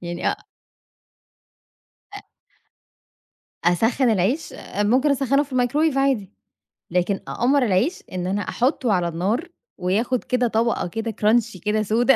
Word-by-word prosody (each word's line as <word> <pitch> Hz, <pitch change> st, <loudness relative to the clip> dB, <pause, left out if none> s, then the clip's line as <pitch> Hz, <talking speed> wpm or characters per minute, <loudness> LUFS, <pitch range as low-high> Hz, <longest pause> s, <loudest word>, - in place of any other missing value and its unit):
يعني 175 Hz, 0 st, -2 dB
أ -, -, -7 dB, 1.8 s
آآ 405 Hz, -, -7 dB, 1.4 s
أسخّن 225 Hz, +8 st, +2 dB
العيش؟ 220 Hz, -, 0 dB, 0.2 s
ممكن 250 Hz, +8 st, +3 dB
أسخّنه 275 Hz, 0 st, +2 dB
في 285 Hz, -2 st, -11 dB
الميكروويف 270 Hz, +4 st, +1 dB
عادي. 260 Hz, -8 st, +1 dB, 0.6 s
لكن 180 Hz, +3 st, +1 dB
أقمّر 270 Hz, +3 st, +2 dB
العيش، 235 Hz, -, +1 dB
إن 180 Hz, -1 st, -3 dB
أنا 200 Hz, +2 st, -1 dB
أحطُّه 250 Hz, -2 st, +1 dB
على 180 Hz, -2 st, +1 dB
النار 195 Hz, -, -1 dB, 0.3 s
وياخد 215 Hz, +7 st, 0 dB
كده 250 Hz, -1 st, +1 dB
طبَقة 230 Hz, -4 st, 0 dB
كده 225 Hz, +5 st, -4 dB
كرانشي 220 Hz, -1 st, +1 dB
كده 210 Hz, +4 st, 0 dB
سودا. 240 Hz, +5 st, +3 dB
225 Hz, 125 wpm, -22 LUFS, 195-260 Hz, 1.8 s, ممكن